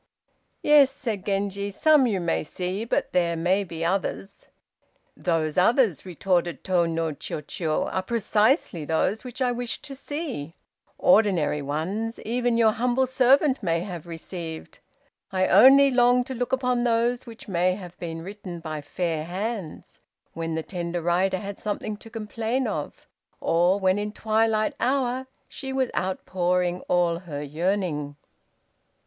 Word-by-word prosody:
"Yes," 295 Hz, -2 st, +6 dB
said 230 Hz, -8 st, -4 dB
Genji; 200 Hz, 0 st, -1 dB
"some 285 Hz, +6 st, +4 dB
you 200 Hz, -5 st, 0 dB
may 170 Hz, -1 st, 0 dB
see, 185 Hz, +6 st, -3 dB
but 235 Hz, -, -1 dB
there 170 Hz, -2 st, +1 dB
may 185 Hz, +4 st, +2 dB
be 165 Hz, -3 st, -5 dB
others!" 195 Hz, +2 st, -3 dB, 0.7 s
"Those 165 Hz, -2 st, 0 dB
others," 215 Hz, -, +3 dB
retorted 175 Hz, -3 st, -1 dB
Tô 175 Hz, -3 st, +1 dB
no 165 Hz, -1 st, -1 dB
Chiûjiô, 155 Hz, +2 st, -3 dB
"are 190 Hz, -, 0 dB
precisely 215 Hz, -, +1 dB
those 165 Hz, +7 st, 0 dB
which 255 Hz, +1 st, -4 dB
I 250 Hz, -, +2 dB
wish 245 Hz, -1 st, -3 dB
to 290 Hz, -2 st, -8 dB
see; 270 Hz, -, -5 dB, 0.4 s
ordinary 180 Hz, -7 st, +3 dB
ones, 185 Hz, +11 st, -3 dB
even 240 Hz, +1 st, 0 dB
your 225 Hz, -2 st, +5 dB
humble 245 Hz, +4 st, +1 dB
servant 260 Hz, +2 st, +3 dB
may 165 Hz, -4 st, 0 dB
have 175 Hz, -3 st, -7 dB
received. 165 Hz, -1 st, -7 dB, 0.5 s
I 185 Hz, -1 st, +2 dB
only 270 Hz, +8 st, +7 dB
long 245 Hz, 0 st, +4 dB
to 260 Hz, -, -6 dB
look 245 Hz, 0 st, -3 dB
upon 250 Hz, -2 st, +1 dB
those 240 Hz, +1 st, +1 dB
which 230 Hz, 0 st, -11 dB
may 180 Hz, -1 st, +1 dB
have 180 Hz, -3 st, -10 dB
been 165 Hz, -1 st, -6 dB
written 195 Hz, -3 st, -7 dB
by 155 Hz, -2 st, -5 dB
fair 160 Hz, +1 st, -2 dB
hands, 190 Hz, -1 st, -5 dB, 0.3 s
when 165 Hz, -1 st, -3 dB
the 160 Hz, -, -2 dB
tender 175 Hz, -1 st, -4 dB
writer 185 Hz, +3 st, +2 dB
had 200 Hz, +1 st, -7 dB
something 210 Hz, 0 st, -3 dB
to 225 Hz, -, -13 dB
complain 225 Hz, +3 st, -2 dB
of, 160 Hz, -10 st, -5 dB, 0.3 s
or 175 Hz, +4 st, +2 dB
when 190 Hz, +1 st, +2 dB
in 210 Hz, 0 st, -3 dB
twilight 220 Hz, 0 st, +1 dB
hour 260 Hz, 0 st, 0 dB, 0.2 s
she 265 Hz, -1 st, -7 dB
was 265 Hz, -1 st, 0 dB
outpouring 180 Hz, -1 st, 0 dB
all 175 Hz, -1 st, +2 dB
her 150 Hz, -5 st, -6 dB
yearning!" 155 Hz, -2 st, -2 dB
195 Hz, 145 wpm, -25 LUFS, 170-235 Hz, 0.7 s, only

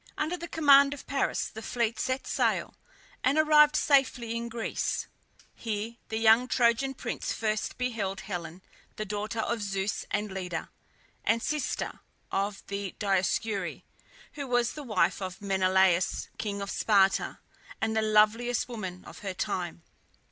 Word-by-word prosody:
Under 310 Hz, +3 st, -1 dB
the 340 Hz, -1 st, -7 dB
command 280 Hz, -3 st, +6 dB
of 285 Hz, -, -12 dB
Paris 275 Hz, 0 st, 0 dB
the 220 Hz, -, -9 dB
fleet 230 Hz, -1 st, -1 dB
set 260 Hz, +1 st, -1 dB
sail, -, -, 0 dB, 0.5 s
and 270 Hz, +4 st, +3 dB
arrived 300 Hz, -1 st, +6 dB
safely 255 Hz, -6 st, +2 dB
in 235 Hz, 0 st, -3 dB
Greece. 230 Hz, -1 st, -2 dB, 0.5 s
Here 225 Hz, +1 st, -4 dB
the 220 Hz, -, -2 dB
young 225 Hz, +2 st, +5 dB
Trojan 250 Hz, +2 st, +2 dB
prince -, -, -3 dB
first 215 Hz, -1 st, -2 dB
beheld 220 Hz, -6 st, -2 dB
Helen, 175 Hz, -2 st, -6 dB, 0.3 s
the 215 Hz, -, -4 dB
daughter 210 Hz, +2 st, -3 dB
of 230 Hz, +1 st, -2 dB
Zeus 195 Hz, 0 st, -2 dB
and 210 Hz, 0 st, -1 dB
Leda, 180 Hz, -3 st, -4 dB, 0.5 s
and 230 Hz, 0 st, +2 dB
sister 300 Hz, -1 st, -2 dB, 0.3 s
of 200 Hz, +1 st, -1 dB
the 200 Hz, -1 st, -4 dB
Dioscuri, 195 Hz, 0 st, 0 dB, 0.5 s
who 285 Hz, -3 st, -5 dB
was 245 Hz, -1 st, +1 dB
the 300 Hz, -, -7 dB
wife 200 Hz, -8 st, +1 dB
of 185 Hz, -1 st, -5 dB
Menelaus, 190 Hz, -2 st, +2 dB
king 200 Hz, -2 st, -3 dB
of 200 Hz, -, -5 dB
Sparta, 195 Hz, -3 st, +3 dB, 0.4 s
and 220 Hz, 0 st, 0 dB
the 220 Hz, -, +3 dB
loveliest 220 Hz, +3 st, +3 dB
woman 190 Hz, -7 st, -6 dB
of -, -, -11 dB
her 195 Hz, -2 st, -5 dB
time. 175 Hz, -2 st, -3 dB
220 Hz, 145 wpm, -29 LUFS, 195-245 Hz, 0.5 s, command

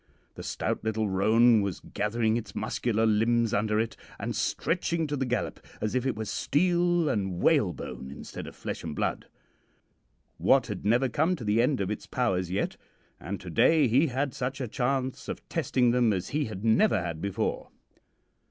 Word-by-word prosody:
The -, -, -9 dB
stout -, -, -3 dB
little 110 Hz, -1 st, 0 dB
roan 110 Hz, +4 st, +4 dB
was 100 Hz, -2 st, -3 dB
gathering 110 Hz, +1 st, -1 dB
its 115 Hz, -2 st, -5 dB
muscular 115 Hz, -2 st, 0 dB
limbs 115 Hz, +1 st, +2 dB
under 105 Hz, +1 st, +1 dB
it, 115 Hz, 0 st, -1 dB, 0.2 s
and -, -, -3 dB
stretching 170 Hz, -1 st, 0 dB
to 145 Hz, -1 st, -2 dB
the 135 Hz, -2 st, -1 dB
gallop 125 Hz, +1 st, -2 dB, 0.2 s
as 110 Hz, -, -2 dB
if 130 Hz, +1 st, 0 dB
it 130 Hz, -, 0 dB
were 110 Hz, 0 st, -4 dB
steel 175 Hz, -, +1 dB
and 95 Hz, -8 st, -1 dB
whale 140 Hz, -, +3 dB
bone 65 Hz, -, -7 dB
instead 70 Hz, -, -8 dB
of -, -, -10 dB
flesh -, -, -5 dB
and 80 Hz, -3 st, -5 dB
blood. -, -, -2 dB, 1.1 s
Wat -, -, +4 dB
had -, -, -5 dB
never 120 Hz, +5 st, +3 dB
come 155 Hz, +8 st, +1 dB
to 130 Hz, -, -8 dB
the 105 Hz, +2 st, +2 dB
end 125 Hz, -1 st, +1 dB
of 100 Hz, +1 st, -1 dB
its 105 Hz, -, -5 dB
powers 95 Hz, -8 st, 0 dB
yet, 95 Hz, +3 st, -2 dB, 0.4 s
and 95 Hz, +5 st, -5 dB
to 90 Hz, -, -8 dB
day 155 Hz, -, +4 dB
he 135 Hz, +8 st, +4 dB
had 135 Hz, 0 st, -1 dB
such 135 Hz, +1 st, -3 dB
a 130 Hz, -, -2 dB
chance 130 Hz, +2 st, -2 dB
of -, -, -6 dB
testing 125 Hz, -2 st, +2 dB
them 120 Hz, -3 st, +3 dB
as 95 Hz, -2 st, -3 dB
he 150 Hz, 0 st, 0 dB
had 110 Hz, -1 st, -6 dB
never 110 Hz, -1 st, +4 dB
had 85 Hz, -2 st, -4 dB
before. 100 Hz, -1 st, -2 dB
115 Hz, 185 wpm, -28 LUFS, 105-135 Hz, 1.1 s, roan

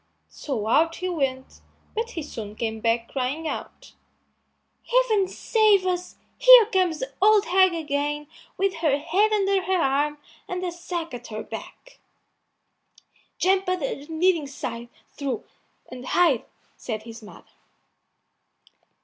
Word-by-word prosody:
So 250 Hz, -8 st, -4 dB
out 325 Hz, +9 st, +3 dB
he 370 Hz, 0 st, -3 dB
went, 270 Hz, -6 st, -3 dB, 0.3 s
but 455 Hz, +2 st, -2 dB
he 325 Hz, -, -2 dB
soon 215 Hz, -7 st, -8 dB
came 220 Hz, -1 st, -3 dB
back 230 Hz, +1 st, 0 dB
crying 275 Hz, +5 st, -2 dB
out, -, -, -7 dB, 0.9 s
"Heaven 470 Hz, -6 st, +3 dB
save 420 Hz, -1 st, +2 dB
us! 360 Hz, -1 st, -2 dB, 0.2 s
Here -, -, +9 dB
comes 370 Hz, -6 st, +1 dB
the 265 Hz, +1 st, -5 dB
old 425 Hz, +1 st, +5 dB
hag 375 Hz, -2 st, +4 dB
again 295 Hz, -1 st, -2 dB, 0.3 s
with 390 Hz, -2 st, 0 dB
her 310 Hz, -4 st, +2 dB
head 390 Hz, +9 st, +1 dB
under 395 Hz, -2 st, +2 dB
her 375 Hz, 0 st, 0 dB
arm 295 Hz, -1 st, +1 dB, 0.3 s
and 365 Hz, 0 st, -4 dB
a 360 Hz, -, -2 dB
sack 345 Hz, -2 st, -5 dB
at 245 Hz, 0 st, -8 dB
her 215 Hz, 0 st, -6 dB
back." -, -, -10 dB, 1.4 s
"Jump 380 Hz, 0 st, +2 dB
under 360 Hz, -7 st, -1 dB
the 285 Hz, +1 st, -11 dB
kneading 325 Hz, -2 st, +2 dB
trough 235 Hz, -3 st, -6 dB, 1.0 s
and 250 Hz, 0 st, -8 dB
hide," 290 Hz, -3 st, +2 dB, 0.3 s
said 215 Hz, -3 st, -5 dB
his 230 Hz, 0 st, -10 dB
mother. 210 Hz, -, -15 dB
330 Hz, 130 wpm, -24 LUFS, 265-375 Hz, 1.4 s, Here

